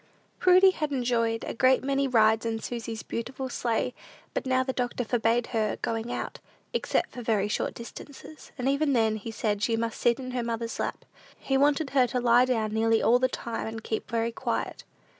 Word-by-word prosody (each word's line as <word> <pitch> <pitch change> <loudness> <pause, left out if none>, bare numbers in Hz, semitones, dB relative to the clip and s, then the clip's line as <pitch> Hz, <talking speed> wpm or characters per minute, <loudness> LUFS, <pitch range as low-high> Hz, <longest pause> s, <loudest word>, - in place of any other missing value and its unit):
Prudy 370 +1 +6
had 305 -5 -3
enjoyed 235 -3 0
a - - -4
great 255 +3 +3
many 275 0 +1
rides 220 -3 +4
in 225 -1 -2
Susy's 230 -1 -5
beautiful 260 +3 -4
sleigh; 240 0 -1 0.4
but - - -2
now 260 0 +3
the 260 0 -2
doctor 245 0 -2
forbade 230 0 +1
her 215 -2 0
going 225 +1 -2
out, - - -4 0.3
except 475 - 0
for 245 - -7
very 215 -3 +1
short 210 - -2
distances, 285 +5 -11
and 255 0 -2
even 280 +1 +2
then, 220 -3 +2
he 215 +2 -7
said, 215 -3 -1
she 225 +1 +1
must 230 0 -3
sit 235 -1 +3
in 255 -1 -5
her 250 -1 -1
mother's 230 0 -3
lap. - - -3 0.3
He 270 - -2
wanted 285 +1 +2
her 260 -3 +4
to 250 - -1
lie 245 +1 +5
down 225 -4 0
nearly 225 0 +3
all 245 +2 +5
the 255 0 +2
time, 235 -3 -4
and 220 0 -6
keep 220 - -3
very 230 0 0
quiet. - - -3
235 Hz, 195 wpm, -27 LUFS, 225-260 Hz, 0.4 s, Prudy